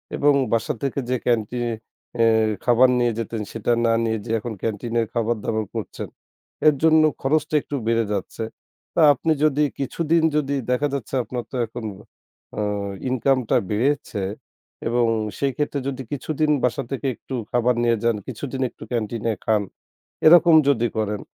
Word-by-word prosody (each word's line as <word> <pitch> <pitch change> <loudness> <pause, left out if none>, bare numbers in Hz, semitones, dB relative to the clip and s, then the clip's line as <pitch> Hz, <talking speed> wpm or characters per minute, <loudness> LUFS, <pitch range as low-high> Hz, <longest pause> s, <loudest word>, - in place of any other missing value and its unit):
এবং 145 0 +4 0.2
বাসা 115 -1 +1
থেকে 140 0 -1
যে 130 - +2
ক্যান্টিনে 120 0 0 0.5
এ - - +6 0.4
খাবার 125 +1 +5
নিয়ে 120 -1 +2
যেতেন 115 0 -3
সেটা 115 +1 -1
না 115 - +3
নিয়ে 110 -1 0
যে 115 - -4
এখন 115 +1 -5
ক্যান্টিনের 115 +1 -1
খাবার 115 -1 0
দাবার 110 -1 -1
করছেন। - - -5 0.6
এর 150 - +6
জন্য 160 -1 +6 0.2
খরচটা 150 +2 +1
একটু 145 - -6
বেড়ে 115 -1 +2
যাচ্ছে। 105 +3 -4 0.5
তা 170 - +3
আপনি 160 +4 -1
যদি 150 -1 +3 0.2
কিছুদিন 165 +4 +1
যদি 140 -1 0 0.2
দেখা 135 +4 +2
যাচ্ছে 135 -4 -5
আপনার 120 -1 -5
তো - - -7
এখন 115 0 -8 0.7
আ - - +1 0.5
ইনকাম 130 +1 +2
টা - - +4
বেড়েছে 115 -1 0 0.7
এবং 120 0 +2 0.3
সেই 140 -1 0
ক্ষেত্রে 145 -1 -1
যদি 135 -1 -3
কিছুদিন 150 +2 0
বাসা 125 +2 +1
থেকে 135 0 -2
একটু 130 - -7 0.2
খাবার 120 0 +2
নিয়ে 115 -1 +3
যান, 115 -1 +2
কিছুদিন 130 +2 -5
একটু - - -13
ক্যান্টিনে 115 -1 -1
খান, 110 -2 +3 0.7
এরকম 170 0 +8
যদি 120 -4 +3
করেন। 105 -2 -1
120 Hz, 155 wpm, -23 LUFS, 115-140 Hz, 0.7 s, এরকম